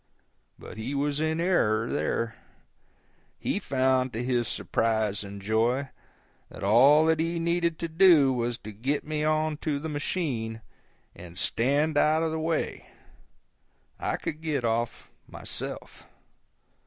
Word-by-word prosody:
But - - -11
he 125 +6 -3
was 145 +1 0
in 160 +1 0
error 115 - +2
there. 110 +8 -1 1.0
He - - -1
found, 130 -1 +1
to 115 +2 -3
his 120 -2 0
surprise 110 -3 0
and 100 0 -8
joy, 115 +7 0 0.6
that - - -10
all 135 +10 +6
that 160 0 +2
he 165 +1 0
needed 170 0 0
to 170 - -3
do 160 -5 +5
was 120 -1 -1
to 110 -2 -9
get 130 +8 -2
me 150 0 -2
on 155 0 +1
to 150 -1 -2
the 160 +3 -5
machine 130 -8 -3 0.5
and 90 0 -11
stand 145 +9 +1
out 155 +1 +3
of 160 - 0
the 160 - -2
way; 160 0 -2 1.1
I - - -1
could 155 0 -5
get 150 -6 -1
off, 115 +1 -1 0.2
myself. - - -7
140 Hz, 140 wpm, -27 LUFS, 115-155 Hz, 1.1 s, all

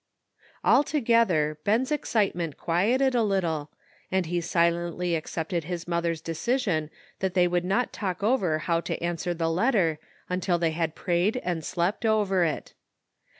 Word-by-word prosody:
Altogether, 230 - +3
Ben's 235 +7 +1
excitement 195 - 0
quieted 240 +11 +2
a 240 - +3
little, 170 -8 0 0.4
and 190 -1 +1
he 175 +1 -1
silently 170 +1 0
accepted 165 +1 -3
his 175 0 -5
mother's 170 -2 -1
decision 165 - -1 0.3
that 190 -1 -2
they 180 -1 +4
would 175 0 0
not 195 +7 0
talk 190 -2 -3
over 200 -9 +2
how 165 +1 0
to - - -4
answer 175 +1 -2
the 165 0 -1
letter 175 - +2 0.3
until 180 -1 0
they 165 -1 +1
had 160 -1 -2
prayed 180 +5 +1
and 175 -3 -2
slept 175 +7 -1
over 205 -4 +2
it. 160 -3 -2
175 Hz, 145 wpm, -26 LUFS, 165-205 Hz, 0.4 s, they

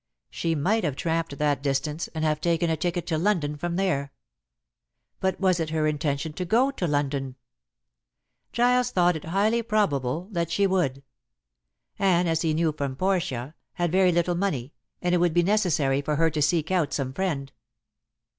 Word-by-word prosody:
She 165 -1 -1
might 195 +9 +1
have 150 -5 -1
tramped 165 -2 -2
that 145 -3 +1
distance, 145 +3 -1
and 160 0 -1
have 155 -1 0
taken 170 -1 +1
a - - +2
ticket 175 +2 -2
to 160 -3 -1
London 165 -6 +1
from 170 +3 -3
there. 155 -8 0 1.1
But 190 0 -1
was 185 -2 +2
it 160 -1 -1
her 155 -1 0
intention 150 0 -1
to 180 - -4
go 235 +10 +2
to 190 -10 -2
London? 140 -3 -1 1.2
Giles 245 +1 +3
thought 180 -5 +3
it 160 - -6
highly 205 +7 +1
probable 175 - 0
that 170 -4 -1
she 200 +4 +2
would. 170 -9 0 1.0
Anne, 180 -3 +3
as 165 -1 +1
he 160 -3 +1
knew 160 0 +2
from 140 -3 -4
Portia, 155 -7 -1 0.2
had 175 -2 -1
very 185 0 +4
little 175 +1 +1
money, 165 -8 -2 0.3
and 180 0 +1
it 180 - +3
would 175 -1 +2
be 175 - +4
necessary 165 -9 +2
for 150 +1 -1
her 165 +2 +2
to 150 0 -2
seek 160 +3 +1
out 175 -6 +1
some 130 -2 -2
friend. 140 -5 -2
165 Hz, 175 wpm, -26 LUFS, 145-185 Hz, 1.2 s, very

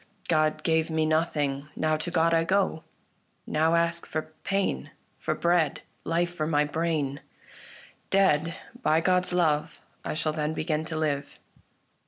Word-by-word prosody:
God 155 -1 +2
gave 160 0 +2
me 160 -1 +1
nothing; 150 -3 0
now 155 0 +1
to 155 +3 -3
God 165 0 +2
I 165 0 +4
go, 190 -2 +1 0.6
Now 160 +2 +2
ask 170 0 0
for 155 0 -4
pain, 195 - -1 0.3
for - - -1
bread, 170 -4 +2 0.2
Life 170 +2 0
for 155 -3 -2
my 150 -2 +3
brain: 150 -3 -1 0.9
dead. 165 -4 +3 0.3
By 160 -8 +3
God's 180 +2 +2
love 160 -3 +1 0.2
I - - -3
shall 155 -1 -1
then 155 0 -2
begin 155 -1 -1
to 160 0 -4
live." 145 -2 -2
160 Hz, 145 wpm, -27 LUFS, 155-170 Hz, 0.9 s, I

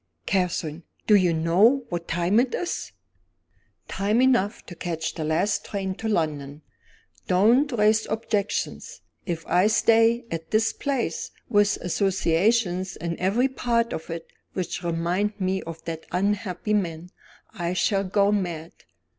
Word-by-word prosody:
"Catherine! 175 -4 -1 0.2
do 215 - +4
you 185 -4 +5
know 190 +11 +3
what 170 -1 -4
time 175 +5 +2
it 250 0 +1
is?" 355 - -3 1.0
"Time 205 +4 0
enough 240 -4 +2
to - - -9
catch 165 -2 -3
the 160 - -4
last 160 +7 0
train 195 -2 -3
to 225 - -5
London. 150 -6 -2 0.6
Don't 235 +10 +4
raise 215 -1 +3
objections! 215 -2 -2 0.3
If 165 -3 -3
I 180 +3 +3
stay 230 +2 +3
at 165 -1 -5
this 220 +1 +2
place, 275 -4 -2 0.2
with 205 -1 +3
associations 185 +1 +1
in 170 +1 -4
every 205 +8 +2
part 235 -3 0
of 160 - -6
it 165 0 -5 0.3
which 180 -1 -3
remind 175 +5 -1
me 190 0 0
of 165 0 -9
that 165 -1 -6
unhappy 200 +1 -1
man, 175 -3 -2 0.4
I 175 -4 -2
shall 195 +2 +1
go 200 +1 +2
mad! 175 -5 -2
190 Hz, 140 wpm, -25 LUFS, 170-215 Hz, 1.0 s, you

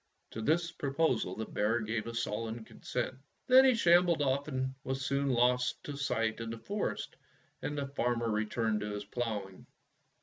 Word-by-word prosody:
To 110 - -5
this 170 +7 +1
proposal 140 - 0
the 110 - -3
bear 110 +3 +1
gave 110 0 -2
a 115 - -5
sullen 115 0 -3
consent. 125 +3 -4 0.3
Then 260 +1 +8
he 260 -2 +5
shambled 175 -6 +4
off 140 +1 +1
and 130 -2 -2
was 130 0 -2
soon 140 0 +1
lost 125 0 +3
to 145 - -5
sight 115 -6 0
in 115 - -4
the 115 - -5
forest, 200 - -3 0.5
and 145 - -3
the 140 - -1
farmer 120 -4 0
re 105 0 0
turned 110 -1 0
to 105 - -3
his 105 0 -4
ploughing. 105 -4 -4
125 Hz, 175 wpm, -32 LUFS, 110-140 Hz, 0.5 s, Then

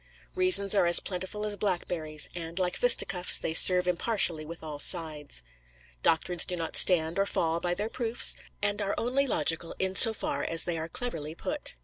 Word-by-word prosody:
Reasons 365 - +4
are 195 -4 +2
as 170 - +8
plentiful 190 +3 -6
as 210 -1 0
blackberries; 170 -6 -3
and, 170 0 -7
like 180 -1 -2
fisticuffs, 180 -7 +3
they 160 - -5
serve 180 +2 +4
impartially 180 -3 0
with 165 +2 -11
all 150 -2 -8
sides. 150 - -2 0.6
Doctrines 165 - 0
do 180 - -4
not 165 -2 -6
stand 170 -1 +3
or 195 - 0
fall 165 -2 -2
by 175 0 -3
their 205 +3 -4
proofs, 230 0 +3 0.3
and 205 0 +2
are 200 -1 -3
only 265 +4 -1
logical 165 - 0
in 190 0 -2
so 225 +4 +5
far 220 - -4
as 165 0 +4
they 170 -2 -3
are 160 +1 -7
cleverly 160 - -5
put. 285 - -4
180 Hz, 185 wpm, -27 LUFS, 165-205 Hz, 0.6 s, as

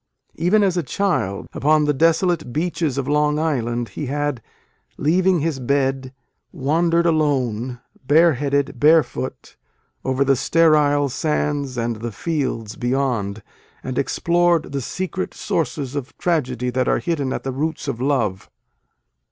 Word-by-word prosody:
Even 200 +5 +2
as 185 -3 +1
a - - +2
child, 135 - -1
upon 150 +1 +3
the 150 - +2
desolate 165 -1 +2
beaches 160 -1 -1
of 135 - -2
Long 150 0 +2
Island, 120 -7 -1
he 150 - -5
had, 145 -2 -2 0.3
" - - -42
leaving 180 +3 +2
his 155 -3 -1
bed, 135 0 0 0.4
wandered 165 +5 +1
alone, 130 -7 0 0.3
bare 160 +3 +5
headed, 140 -1 -1
barefoot," 150 -4 +1 0.5
over 130 +1 +1
the 135 0 +4
sterile 150 -1 +3
sands 145 -2 -1
and 115 -1 -1
the 115 +2 -5
fields 115 - -3
beyond, 120 -5 -1 0.4
and 130 -1 -3
explored 170 +1 +1
the 140 -1 -2
secret 185 +7 -4
sources 140 -3 -2
of 140 -1 -5
tragedy 130 -7 -1
that 130 +1 0
are - - +3
hidden 145 -7 -2
at - - -3
the 135 - -2
roots 155 +4 -3
of 115 - -3
love. 125 -9 0
145 Hz, 140 wpm, -21 LUFS, 130-160 Hz, 0.5 s, bare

